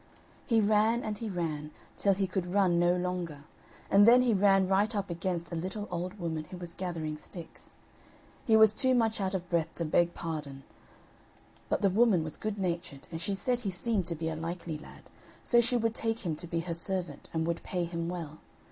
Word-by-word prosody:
He 230 -3 +4
ran, 215 +3 +3
and 210 -1 -4
he 225 - -4
ran, 160 -5 -3 0.3
till 200 -1 +3
he 195 0 +1
could 185 -1 -3
run 185 -3 +3
no 175 +1 +4
longer, 175 -5 -3 0.5
and 205 +2 +7
then 250 +2 +8
he 240 -3 +3
ran 195 -1 +4
right 205 +4 +2
up 200 -3 -2
against 170 0 -3
a - - -3
little 190 +5 -4
old 180 +4 -4
woman 160 -4 -3
who 180 - -9
was 175 -1 -7
gathering 165 -5 -4
sticks. 170 +2 -10 0.7
He 220 -2 +6
was 220 -1 +7
too 260 +2 +2
much 225 -3 +1
out 190 0 0
of 180 -1 -4
breath 170 -2 -1
to 170 - -2
beg 170 +2 +2
pardon, 150 -5 -5 1.1
but - - 0
the 195 - +4
woman 205 -4 +4
was 155 -1 -5
good 215 -1 -4
natured, 170 -6 -3
and 165 -1 -5
she 200 - -1
said 245 +5 0
he 220 -5 -3
seemed 190 0 -1
to 170 - 0
be 160 +1 -3
a 160 - -2
likely 165 -1 -4
lad, - - -13 0.4
so 240 -1 +4
she 245 +1 +2
would 225 -1 0
take 225 -1 -1
him 160 -3 0
to 175 - -2
be 165 0 -1
her 170 0 -4
servant, 170 -3 -3
and 160 0 -1
would 170 0 -2
pay 180 -2 -2
him 170 0 -3
well. 165 -4 -6
180 Hz, 210 wpm, -30 LUFS, 170-205 Hz, 1.1 s, then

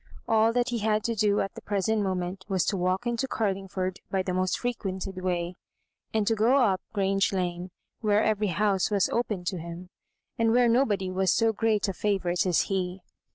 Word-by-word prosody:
All 225 0 +4
that 245 +1 +1
he 240 -1 -1
had 215 0 +1
to 230 - 0
do 205 -1 +2
at 195 - -3
the - - -10
present 210 +2 0
mo 190 -2 0
ment 180 +1 -4
was 190 -3 +1
to - - +1
w&Xk 185 +3 0
into 240 +2 -1
Carlingford 195 -4 -2
by 190 -1 0
che 185 - -2
most 185 0 0
frequented 195 -6 -4
way, 175 -1 -1 0.6
and 220 -2 +1
to 225 - +2
go 225 +4 +3
up 200 -8 +3
Grange 195 -1 +1
Lane, 180 -1 -2 0.3
where 210 -1 +2
every 215 -1 +1
house 195 +1 +1
was 200 -3 +2
open 215 -6 -1
to 180 0 -2
him, 170 +2 -8 0.5
and 225 0 +3
where 245 0 +5
nobody 215 -6 +2
was 185 0 +2
so 225 -1 +2
great 215 -1 +1
a - - 0
fiivourite 185 -2 0
as 175 - +3
he. 185 -1 -2
195 Hz, 200 wpm, -27 LUFS, 185-220 Hz, 0.6 s, where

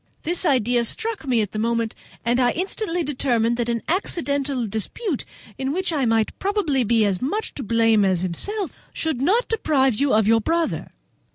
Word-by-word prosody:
This 350 +2 0
idea 245 -3 +2
struck 440 - -2
me 240 -3 +3
at 205 - -3
the 215 - -4
moment, 230 0 0 0.3
and 240 +2 +2
I 245 -1 +3
instantly 360 -1 -2
determined 240 -5 +1
that 240 -1 -1
an 230 -1 -1
accidental 285 - -1
dispute, 240 - -3 0.3
in 265 0 -1
which 360 +2 -1
I 280 -4 +1
might 225 -1 +1
probably 385 -10 +1
be 225 -1 +3
as 195 -3 0
much 410 +12 -2
to - - -6
blame 225 -2 +3
as 185 -3 +2
himself, 370 - -2 0.2
should 315 -6 -2
not 425 - +2
deprive 285 - +2
you 275 +5 +1
of 220 -1 +4
your 225 0 +4
brother. 330 +6 -1
265 Hz, 180 wpm, -23 LUFS, 225-335 Hz, 0.3 s, of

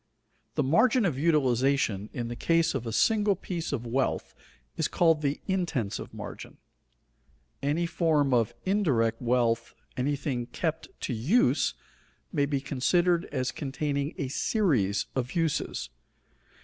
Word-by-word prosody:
_ - - -44
The - - +2
margin 220 - +4
of 145 -8 0
utilization 135 - +2
in 120 -2 -4
the 120 - -5
case 165 +4 +2
of 125 -3 -3
a - - -2
single 210 - +3
piece 175 -2 -4
of 125 -4 -3
wealth 130 +3 -1 0.4
is - - 0
called 165 -3 +3
the 140 -1 -1
intensive 165 - -2
margin. - - -8 1.0
Any 150 +5 +1
form 155 -5 +2
of 115 -3 +2
indirect 135 - +1
wealth, 115 -1 +1 0.2
anything 130 -2 -1
kept 160 +2 -3
to - - -2
use, 165 - +2 0.6
may 145 -3 +2
be 140 -1 0
considered 170 +6 +2
as 130 -2 -2
containing 140 0 -2
a 135 - -2
series 130 - +1
of 130 -1 -2
uses. 160 - -1
140 Hz, 135 wpm, -28 LUFS, 125-170 Hz, 1.0 s, margin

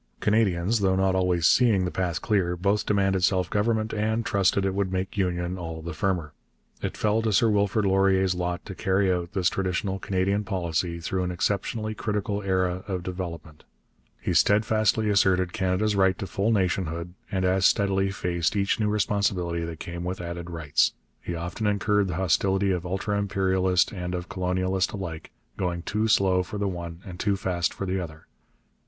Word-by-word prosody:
Canadians, 105 -1 +2
though 95 -1 +2
not 95 0 +2
always 90 -3 +1
seeing 110 -5 +4
the 90 - -2
path 90 -3 -2
clear, 95 -5 +1
both 100 +4 0
demanded 95 -2 +2
self 90 -1 +2
government 110 +1 0
and 110 +1 0
trusted 100 0 +2
it 95 - 0
would 95 -1 -1
make 95 +1 -3
union 90 -1 -1
all 80 -2 -6
the 85 0 -5
firmer. 85 -2 -1 0.5
It - - -3
fell 110 +1 +1
to 110 -1 0
Sir 110 +3 +4
Wilfrid 105 +1 +1
Laurier's 95 -1 +3
lot 90 0 -3
to 100 - -6
carry 95 0 +1
out 90 0 -3
this 95 -4 +1
traditional 95 +1 -1
Canadian 100 +2 0
policy 85 -4 -2
through 90 +3 -2
an 90 - -1
exceptionally 105 +5 -1
critical 105 -1 -2
era 95 -1 0
of 95 -3 -3
development. 85 -4 -6 0.6
He - - -2
steadfastly 110 +1 +3
asserted 95 -3 +2
Canada's 100 +1 0
right 95 -2 +3
to - - -4
full 100 +3 0
nationhood, 90 -4 -1 0.2
and 95 -1 0
as 95 0 +4
steadily 95 -1 +2
faced 90 -2 -1
each 100 +2 +1
new 105 -1 +1
responsibility 95 -4 0
that 80 -1 -7
came 85 0 -6
with 90 +1 -3
added 85 0 -6
rights. 80 -4 +1 0.3
He 85 - -4
often 90 +6 -3
incurred 105 0 +2
the 90 - -3
hostility 95 +2 +2
of 90 -1 -2
ultra 100 +3 -1
imperialist 95 -2 +1
and 90 -2 -4
of 90 0 -5
colonialist 95 0 0
alike, 85 -6 -6 0.3
going 85 -2 -2
too 105 +4 0
slow 95 -3 +3
for 90 +3 -6
the 100 0 -1
one 85 -2 -6
and 90 -2 -9
too 100 -2 +1
fast 90 -3 -1
for 100 - -5
the 95 0 -1
other. 80 -3 -8
95 Hz, 180 wpm, -26 LUFS, 90-100 Hz, 0.6 s, seeing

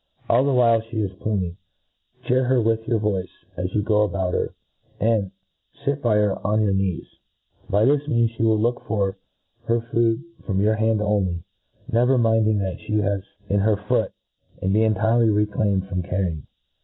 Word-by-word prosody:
All 120 +3 +4
the 140 - +1
while 115 -3 +4
fee 115 0 -4
is 95 -1 -4
pluming, 95 -5 -2 0.7
chear 130 +1 +2
her 130 0 +3
with 115 0 0
your 115 - +2
voice 100 -4 -1 0.3
as 90 +1 -3
you 105 - +1
go 105 0 +2
about 95 -3 0
her, - - -2 0.4
and 110 -3 +1 0.6
fit 140 0 0
by 115 -3 +2
her 105 -2 +2
on 105 +2 +1
your 100 -2 +1
knees. 95 -3 -1 0.6
By 105 +2 +3
this 145 +2 +2
means 115 -5 +2
fhc 115 - -22
will 110 -1 +3
look 120 +3 0
for 100 -2 -1 0.5
her 115 0 +2
food 115 +2 0 0.2
from 95 -3 -1
your 105 +2 +3
own 110 - -4
hand 110 -1 +2
on 105 -2 +1
ly, 85 -2 -5 0.5
never 125 +3 +3
minding 110 -3 +2
what 95 -1 -4
fhe 105 0 -1 0.2
h?is 95 - -12 0.2
in 100 0 +1
her 105 +1 +2
foot, 105 +1 0 0.5
and 95 +1 0
be 110 - +3
entirely 110 +2 +3
reclaimed 105 -2 +1
from 90 -1 -2
carrying. 90 -4 -3
105 Hz, 185 wpm, -23 LUFS, 100-115 Hz, 0.7 s, All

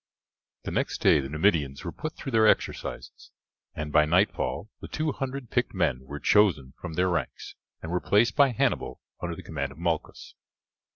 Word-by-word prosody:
The - - -4
next - - -1
day - - +5
the 65 -1 -4
Numidians 75 -2 +1
were 85 - -3
put 155 - -5
through 135 - -6
their 110 -2 +5
exercises, - - -1 0.5
and 75 -1 -4
by 75 0 +5
nightfall 95 +4 0
the - - -8
two 155 -1 -1
hundred 135 -2 -5
picked 125 -3 0
men 80 -9 +1
were 70 +2 -7
chosen 80 -12 +3
from 80 - -6
their 90 +3 +2
ranks 90 -2 -3 0.3
and 80 - -5
were 90 - 0
placed 105 +4 +3
by 140 -2 +6
Hannibal 120 - -1 0.2
under 85 -1 -3
the - - -10
command 70 -3 -4
of 70 - -14
Malchus. 85 -2 -3
85 Hz, 180 wpm, -27 LUFS, 75-110 Hz, 0.5 s, by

